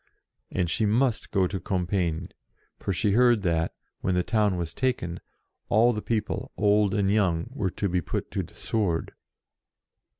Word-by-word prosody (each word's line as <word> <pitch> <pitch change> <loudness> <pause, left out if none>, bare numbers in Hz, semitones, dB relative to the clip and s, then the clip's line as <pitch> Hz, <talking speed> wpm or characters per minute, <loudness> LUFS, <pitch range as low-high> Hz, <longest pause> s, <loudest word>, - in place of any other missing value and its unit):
And 90 -2 0
she 105 +6 +1
must 120 +2 +1
go 95 -2 +2
to 95 +1 -3
Compiegne, 90 -2 -1 0.5
for - - -2
she 100 +3 +1
heard 120 -1 +4
that, 80 -2 0 0.2
when 95 - 0
the 90 - +2
town 105 -4 +1
was 85 -2 -3
taken, 105 -10 -1 0.5
all 115 +3 +5
the 105 - -3
people, 110 -2 -2
old 105 -1 +3
and 100 -2 +2
young, 95 -2 +1
were 105 -9 -1
to 100 - -2
be 90 -1 0
put - - -4
to - - -1
the - - -11
sword. 100 -7 -1
100 Hz, 165 wpm, -27 LUFS, 90-110 Hz, 0.5 s, all